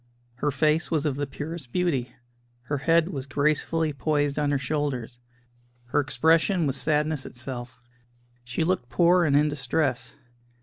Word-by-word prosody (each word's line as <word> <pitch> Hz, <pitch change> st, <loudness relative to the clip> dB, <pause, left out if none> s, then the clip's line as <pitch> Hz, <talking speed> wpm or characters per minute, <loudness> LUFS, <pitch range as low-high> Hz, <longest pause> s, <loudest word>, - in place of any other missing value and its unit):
Her 145 Hz, -, 0 dB
face 150 Hz, +4 st, +1 dB
was 160 Hz, -2 st, 0 dB
of 145 Hz, -3 st, 0 dB
the 145 Hz, 0 st, -2 dB
purest 145 Hz, -1 st, -7 dB
beauty; 135 Hz, -9 st, -1 dB, 0.5 s
her 145 Hz, +3 st, -2 dB
head 165 Hz, +4 st, +3 dB
was 140 Hz, -6 st, -5 dB
gracefully 150 Hz, +2 st, 0 dB
poised 145 Hz, +1 st, 0 dB
on 145 Hz, -1 st, +1 dB
her 145 Hz, -, +2 dB
shoulders; 135 Hz, -4 st, -3 dB, 0.7 s
her -, -, +2 dB
expression 165 Hz, +5 st, +2 dB
was 135 Hz, -2 st, 0 dB
sadness 150 Hz, +1 st, 0 dB
itself. 120 Hz, 0 st, -7 dB, 0.6 s
She 125 Hz, +6 st, -2 dB
looked 170 Hz, -7 st, -1 dB
poor 175 Hz, +3 st, +4 dB
and 140 Hz, -2 st, +2 dB
in 150 Hz, +1 st, +4 dB
distress. 135 Hz, -2 st, -1 dB
145 Hz, 145 wpm, -26 LUFS, 135-160 Hz, 0.7 s, poor